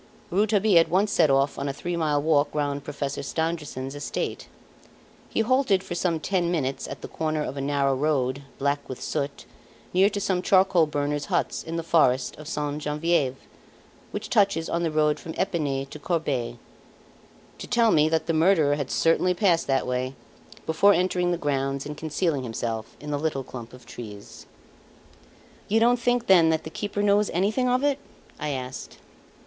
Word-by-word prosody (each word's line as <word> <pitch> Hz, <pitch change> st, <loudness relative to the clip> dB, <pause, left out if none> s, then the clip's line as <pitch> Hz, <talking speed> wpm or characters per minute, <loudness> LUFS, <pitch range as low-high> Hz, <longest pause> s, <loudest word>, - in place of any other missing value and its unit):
Rouletabille 205 Hz, -1 st, +4 dB
at 165 Hz, -, +3 dB
once 200 Hz, +4 st, +2 dB
set 165 Hz, -6 st, +4 dB
off 135 Hz, +1 st, +2 dB
on 140 Hz, -, -2 dB
a -, -, -2 dB
three 175 Hz, +5 st, -4 dB
mile 155 Hz, -3 st, +1 dB
walk 150 Hz, -1 st, +2 dB
round 145 Hz, -1 st, -1 dB
Professor 140 Hz, -1 st, -4 dB
Stangerson's 150 Hz, -4 st, -3 dB
estate. 145 Hz, 0 st, -4 dB, 0.8 s
He -, -, 0 dB
halted 225 Hz, -5 st, +2 dB
for 190 Hz, -, -6 dB
some 170 Hz, -2 st, 0 dB
ten 175 Hz, +1 st, 0 dB
minutes 140 Hz, -6 st, -2 dB
at -, -, -8 dB
the -, -, -6 dB
corner 155 Hz, -1 st, -2 dB
of 135 Hz, -, -5 dB
a 140 Hz, -, -3 dB
narrow 140 Hz, -1 st, +1 dB
road 135 Hz, -2 st, 0 dB, 0.2 s
black 140 Hz, +1 st, -1 dB
with 130 Hz, -, -6 dB
soot, 140 Hz, 0 st, -3 dB, 0.5 s
near 190 Hz, +3 st, +5 dB
to 205 Hz, -, -3 dB
some 190 Hz, -2 st, 0 dB
charcoal 185 Hz, -3 st, +4 dB
burners' 145 Hz, 0 st, -2 dB
huts -, -, -1 dB
in 165 Hz, -, -6 dB
the 165 Hz, -, -2 dB
forest 130 Hz, -6 st, +2 dB
of 150 Hz, -, -10 dB
Sainte 150 Hz, -1 st, -3 dB
Genevieve, 150 Hz, -3 st, 0 dB, 0.7 s
which -, -, -5 dB
touches 200 Hz, -8 st, +2 dB
on 170 Hz, -, 0 dB
the 170 Hz, -, +1 dB
road 155 Hz, -1 st, +1 dB
from 160 Hz, -, -8 dB
Epinay 150 Hz, -8 st, -1 dB
to 155 Hz, -, -8 dB
Corbeil, 145 Hz, -8 st, -2 dB, 1.0 s
to -, -, -7 dB
tell 235 Hz, -2 st, +3 dB
me 155 Hz, -2 st, +4 dB
that 160 Hz, 0 st, 0 dB
the 165 Hz, -, 0 dB
murderer 160 Hz, -3 st, +3 dB
had 140 Hz, -3 st, -3 dB
certainly 180 Hz, +2 st, +2 dB
passed 175 Hz, -3 st, +2 dB
that 135 Hz, -1 st, +1 dB
way, 125 Hz, +1 st, -2 dB, 0.5 s
before 200 Hz, +6 st, +4 dB
entering 180 Hz, -1 st, +1 dB
the 175 Hz, -, 0 dB
grounds 135 Hz, -3 st, -1 dB
and 150 Hz, +1 st, -5 dB
concealing 155 Hz, -1 st, -1 dB
himself 115 Hz, -2 st, -4 dB
in 150 Hz, 0 st, -6 dB
the 145 Hz, -, -1 dB
little 145 Hz, -3 st, -1 dB
clump 120 Hz, -2 st, -9 dB
of 125 Hz, -1 st, -14 dB
trees. 105 Hz, -4 st, -10 dB, 1.2 s
"You 220 Hz, +2 st, +3 dB
don't 240 Hz, +2 st, +4 dB
think, 245 Hz, 0 st, +1 dB
then, 175 Hz, -5 st, +6 dB
that 160 Hz, -1 st, +1 dB
the 155 Hz, -, -8 dB
keeper 205 Hz, +2 st, -3 dB
knows 205 Hz, 0 st, +3 dB
anything 215 Hz, +8 st, +1 dB
of 250 Hz, +2 st, +1 dB
it?" 285 Hz, -1 st, +1 dB, 0.4 s
I 150 Hz, -, -2 dB
asked. 130 Hz, -2 st, -6 dB
155 Hz, 180 wpm, -25 LUFS, 140-185 Hz, 1.2 s, then